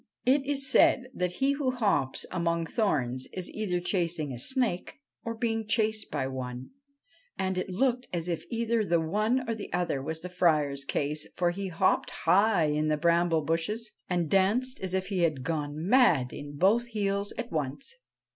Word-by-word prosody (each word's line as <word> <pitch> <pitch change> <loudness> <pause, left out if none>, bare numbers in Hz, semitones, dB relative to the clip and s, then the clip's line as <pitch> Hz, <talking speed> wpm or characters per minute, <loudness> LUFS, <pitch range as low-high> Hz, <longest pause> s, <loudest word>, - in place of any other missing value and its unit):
It 270 +2 +3
is 275 -1 +3
said 260 -1 +4
that 180 -3 -1
he 270 +9 +1
who 280 -2 0
hops 200 - 0
among 170 -2 0
thorns 130 - -1
is 185 -1 -5
either 195 -5 -1
chasing 170 -5 -1
a 120 - -6
snake 250 - -1 0.2
or 230 0 -4
being 225 -1 -1
chased 220 0 +1
by 145 -3 -2
one; 130 -1 -6 0.7
and 190 0 -1
it 185 +1 -2
looked 250 +6 0
as 170 -1 -3
if 170 -2 -2
either 230 -1 0
the 170 -4 +2
one 215 +10 0
or 230 - 0
the 220 -2 -7
other 175 -5 -1
was 160 +3 -5
the 180 - -5
Friar's 150 -6 +1
case, 150 +2 -2
for 175 -1 +1
he 195 +2 -4
hopped 185 +1 +1 0.2
high 200 -2 +4
in 150 +1 0
the 155 0 +1
bramble 170 0 +2
bushes 190 +9 -1 0.2
and 175 -3 0
danced 215 - +2
as 190 -1 -3
if 190 0 -2
he 195 -3 -1
had 155 -6 +1
gone 150 -1 -2
mad 190 - +4
in 145 0 -8
both 220 +8 +3
heels 200 -3 -1
at 240 0 -5
once. 155 - -3
180 Hz, 180 wpm, -28 LUFS, 160-225 Hz, 0.7 s, said